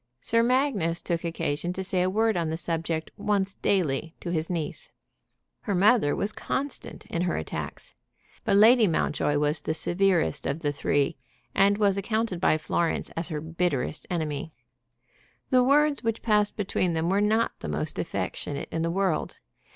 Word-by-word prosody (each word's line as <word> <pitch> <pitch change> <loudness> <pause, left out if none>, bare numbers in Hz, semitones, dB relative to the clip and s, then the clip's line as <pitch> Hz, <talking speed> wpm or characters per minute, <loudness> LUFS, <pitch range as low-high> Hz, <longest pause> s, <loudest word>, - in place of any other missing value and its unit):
Sir 230 - +2
Magnus 235 - +1
took 170 -1 -2
occasion 165 0 -2
to 190 - -4
say 185 -1 0
a 185 - +2
word 220 +3 +2
on 170 -2 0
the 160 - -2
subject 165 -1 -2
once 200 -2 0
daily 165 -6 0
to 170 - -5
his 160 -1 -1
niece. 180 - -4 0.7
Her 205 -4 -1
mother 200 -4 +4
was 205 - -1
constant 275 +5 -4
in 170 - -3
her 175 -1 0
attacks. 80 - -5 0.5
But - - +2
Lady 220 +2 +7
Mountjoy 150 -3 0
was 150 +1 +1
the 155 - -1
severest 175 -4 +1
of 145 +4 -2
the 145 -3 0
three, 145 +2 0 0.4
and 200 +1 +4
was 200 -2 +3
accounted 215 -3 -1
by 155 - +4
Florence 165 +2 -1
as 165 0 -4
her 155 -4 -4
bitterest 160 -3 -2
enemy. 155 -3 -3 1.0
The 255 -1 +5
words 285 +2 +3
which 225 -1 -1
passed 210 -2 +2
between 185 -4 0
them 160 0 0
were 200 +1 +2
not 220 +2 +2
the - - -5
most 75 0 -2
affectionate 145 -1 -3
in 165 - -2
the 165 - 0
world. 185 -1 -1
180 Hz, 165 wpm, -27 LUFS, 160-210 Hz, 1.0 s, Lady